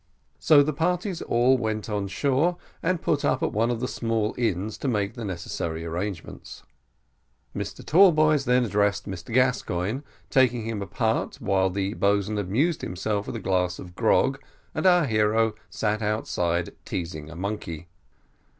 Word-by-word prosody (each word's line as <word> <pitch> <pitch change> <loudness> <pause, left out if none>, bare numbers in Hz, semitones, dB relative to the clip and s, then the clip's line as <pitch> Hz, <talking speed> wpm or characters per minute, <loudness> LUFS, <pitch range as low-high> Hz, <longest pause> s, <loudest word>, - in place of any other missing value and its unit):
So 145 -2 +6
the 155 +2 -1
parties 175 +3 -1
all 125 +2 +3
went 110 -2 -2
on 105 -2 -2
shore, 145 - +1 0.2
and 180 0 0
put 145 -2 +1
up - - +1
at - - +1
one 115 +3 +1
of 120 -1 -2
the 125 - -1
small 115 -3 -1
inns 105 -3 -1
to - - -3
make 105 -5 0
the 120 - -7
necessary 85 -3 -4
arrangements. 85 +2 -6 0.9
Mr - - -5
Tallboys 155 -5 +5
then 125 0 +3
addressed 105 -2 +1
Mr 95 +1 -7
Gascoigne, 125 -4 +1 0.3
taking 125 -4 +3
him 110 -2 -3
apart 100 - -1
while 95 -1 +1
the 95 +2 -2
boatswain 100 0 +1
amused 125 - 0
himself 100 +3 -2
with - - -5
a - - -3
glass 90 -2 0
of 90 -2 -10
grog, 130 +6 +2 0.3
and - - +1
our 180 -3 +5
hero 110 -1 +2 0.2
sat 105 0 -1
outside 90 -5 -1
teasing 80 -4 -5
a 85 - -10
monkey. 90 -4 -5
110 Hz, 155 wpm, -25 LUFS, 95-130 Hz, 0.9 s, So